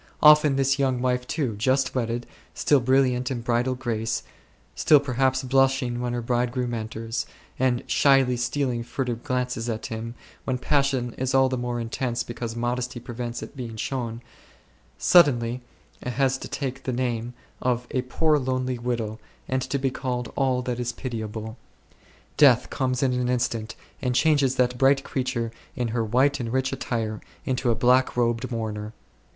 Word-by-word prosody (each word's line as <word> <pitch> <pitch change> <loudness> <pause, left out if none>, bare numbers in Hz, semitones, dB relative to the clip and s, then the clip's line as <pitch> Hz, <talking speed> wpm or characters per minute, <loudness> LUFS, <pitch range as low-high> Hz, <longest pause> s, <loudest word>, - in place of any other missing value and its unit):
Often 150 -2 +7
this 135 0 +2
young 130 -2 +1
wife 125 0 0
too, 130 -9 -1
just 130 +4 +1
wedded, 120 -1 -2 0.3
still 145 - +3
brilliant 130 0 +2
in 125 -3 -3
bridal 120 +2 +1
grace, 115 -3 -2 0.5
still 150 - +5
perhaps 130 -1 +1
blushing 130 -2 +2
when 120 0 -2
her 120 -1 -2
bridegroom 120 +1 0
enters, 115 +1 -4 0.3
and 125 -2 +1
shyly 135 -3 +4
stealing 120 0 -1
furtive 120 -1 -3
glances 125 -2 -2
at 110 -1 -3
him, 115 +1 -5 0.3
when 130 -1 -1
passion 135 -3 +1
is 130 0 0
all 135 0 +5
the 130 - -1
more 120 0 -2
intense 120 +1 -2
because 120 -1 -5
modesty 120 +1 -2
prevents 120 0 -5
it - - -10
being 120 -4 -6
shown, 120 0 -3 0.7
suddenly 125 -8 +4 0.4
has 130 +1 +1
to - - -6
take 135 -2 -4
the 130 - -3
name 120 -1 -2 0.3
of 125 -1 0
a 130 - +1
poor 150 +4 +2
lonely 130 -1 -1
widow 115 -3 -2 0.3
and 130 0 -1
be 135 -1 +1
called 125 -2 -3
all 130 -2 +1
that 125 -1 -3
is 120 0 -1
pitiable. 110 -2 -5 0.8
Death 125 -4 +5
comes 130 -1 0
in 130 -2 +2
an 125 0 0
instant 115 -3 -1 0.3
and 125 -1 0
changes 140 -3 +3
that 125 -1 +1
bright 135 0 +4
creature 125 -3 -2 0.2
in 120 -2 -1
her 115 0 0
white 130 +6 +2
and 115 -2 -3
rich 130 +1 0
attire 110 -3 -3 0.2
into 130 -3 0
a 115 - +3
black 125 +2 +3
robed 120 +1 +1
mourner. 110 -2 -4
125 Hz, 160 wpm, -25 LUFS, 120-130 Hz, 0.8 s, Often